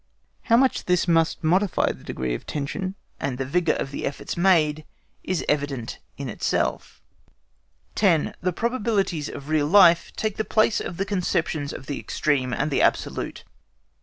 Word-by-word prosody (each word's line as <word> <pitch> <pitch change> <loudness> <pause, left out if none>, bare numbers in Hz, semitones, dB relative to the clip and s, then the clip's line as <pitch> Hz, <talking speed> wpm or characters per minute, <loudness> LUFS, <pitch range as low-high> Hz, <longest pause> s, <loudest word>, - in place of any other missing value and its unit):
How 230 -1 +5
much 265 +1 +2
this 180 0 +2
must 165 0 +2
modify 185 +4 +2
the - - -12
degree 65 -1 -3
of - - -6
tension, 185 +7 -3 0.2
and 130 -2 -2
the 135 - -2
vigour 165 +3 +1
of 135 - -4
the - - -5
efforts 140 - -5
made, 160 -4 +3 0.4
is 185 -2 -2
evident 140 -5 -2 0.2
in 140 - -5
itself. 115 - -2 0.9
10. 175 -7 +2
THE 180 - 0
PROBABILITIES 205 - -1
OF 140 - -8
REAL 155 -2 +1
LIFE 170 -2 +6
TAKE 215 -2 -2
THE 220 - 0
PLACE 215 +1 +2
OF 175 - -6
THE 195 - -1
CONCEPTIONS 165 -6 -1
OF 135 - -8
THE 140 0 -4
EXTREME 135 -4 0
AND 150 +4 -1
THE - - +2
ABSOLUTE. - - 0
165 Hz, 165 wpm, -24 LUFS, 145-190 Hz, 0.9 s, LIFE